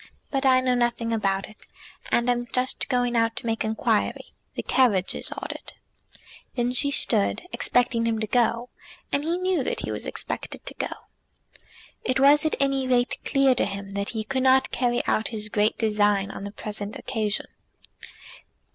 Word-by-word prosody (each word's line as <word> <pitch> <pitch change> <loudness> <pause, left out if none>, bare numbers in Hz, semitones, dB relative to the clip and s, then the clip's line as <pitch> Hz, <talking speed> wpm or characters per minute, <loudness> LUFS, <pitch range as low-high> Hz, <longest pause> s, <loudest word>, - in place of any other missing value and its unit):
"But 270 -1 +1
I 255 -1 +5
know 255 -1 +2
nothing 240 -1 0
about 195 -3 0
it, 215 - -16 0.5
and 235 0 +2
am 240 0 +1
just 255 +1 -1
going 245 -2 +1
out 230 0 +2
to - - -6
make 225 -1 0
inquiry. 220 0 -1 0.2
The - - -3
carriage 205 -8 +3
is - - -5
ordered." - - -6 0.8
Then 245 -1 0
she 280 +3 +4
stood, 225 -5 +1
expecting 240 -2 +1
him 225 -1 0
to 215 - 0
go; 235 +1 +1 0.4
and 285 - +1
he 335 +3 0
knew 370 0 +1
that - - -2
he - - -4
was - - -4
expected - - -5
to - - -7
go. - - -2 1.2
It 255 +1 +1
was 290 +3 +6
at - - -1
any 275 -1 +1
rate 245 -1 +2
clear 275 -1 +3
to 245 - +1
him 195 0 -6
that 200 0 -2
he 220 -2 -3
could 260 +4 -1
not 265 0 +4
carry 240 -1 0
out 220 - +1
his 210 -2 -4
great 210 +1 +1
design 205 -2 +2
on 200 - -7
the 200 - -6
present 210 0 -6
occasion. 215 -4 -1
240 Hz, 175 wpm, -25 LUFS, 215-260 Hz, 1.2 s, was